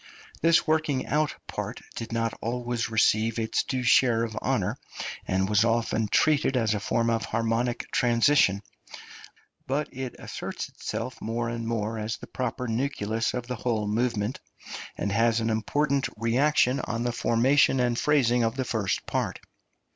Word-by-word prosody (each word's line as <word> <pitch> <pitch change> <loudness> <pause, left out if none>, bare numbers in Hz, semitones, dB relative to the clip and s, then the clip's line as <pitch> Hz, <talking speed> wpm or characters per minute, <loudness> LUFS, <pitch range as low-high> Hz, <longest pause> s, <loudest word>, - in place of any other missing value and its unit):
This 165 0 +4
working 155 -4 +1
out 150 0 0
part - - -5 0.2
did 115 0 -6
not 115 -1 0
always 120 +1 -2
receive 110 0 +2
its 110 -1 0
due 130 -2 -3
share 115 -1 +4
of 110 -2 -4
honour, - - -1 0.5
and 95 +1 +1
was 105 +1 +3
often 115 -1 +1
treated 145 +3 +3
as 115 -3 +2
a 105 - -1
form 115 +3 0
of 115 -1 0
harmonic 115 +2 -1
transition; 115 -4 +3 1.0
but 145 +3 -2
it 130 -1 -5
asserts - - -6
itself 125 +2 -5
more 115 +1 -2
and 115 -1 -4
more 110 -1 -2
as 110 +1 -3
the - - -10
proper 125 -1 -3
nucleus 115 -2 -1
of 125 -1 -3
the 125 0 -4
whole 110 -2 -1
movement, 110 +1 -1 0.6
and 100 - -2
has 115 +2 +3
an 115 0 0
important 140 +5 0
reaction 125 +3 +2
on 115 0 -3
the 120 - 0
formation 130 +4 +3
and 120 -1 +1
phrasing 125 -5 +3
of 115 +1 0
the 130 -1 -2
first 110 -6 -1
part. - - -2
115 Hz, 155 wpm, -27 LUFS, 110-130 Hz, 1.0 s, This